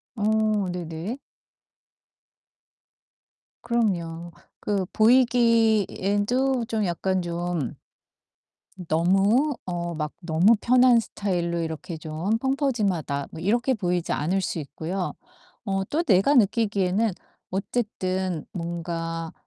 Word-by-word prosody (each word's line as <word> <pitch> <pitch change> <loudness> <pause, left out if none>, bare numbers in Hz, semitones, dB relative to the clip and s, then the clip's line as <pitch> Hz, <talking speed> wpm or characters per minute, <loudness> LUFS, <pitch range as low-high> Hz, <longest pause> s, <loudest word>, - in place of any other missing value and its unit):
어 215 -2 +1
네네. 175 +6 -5 2.5
그럼요. 175 -8 -1 0.3
그 200 -2 -1
보이기에도 230 0 +3
좀 220 -2 -1
약간 185 +1 0
좀 175 -4 -3 1.1
너무 195 - +3
어 175 -1 -3
막 150 -1 -3
너무 175 +6 +4
편한 250 0 +5
스타일로 175 -6 -2
이렇게 160 +1 -4
좀 160 +7 -2
'펑퍼짐하다.' 215 - -1
뭐 - - -9
이렇게 235 +8 +1
보이지 180 -4 -1
않을 180 +7 0
수 175 - -3
있고요. 165 +6 -4 0.5
어 195 -2 0
또 320 +3 0
내가 245 - +4
느끼기에는 205 -2 +2 0.4
어쨌든 190 -4 -2
뭔가 165 -1 -4
190 Hz, 195 characters per minute, -25 LUFS, 170-225 Hz, 2.5 s, 편한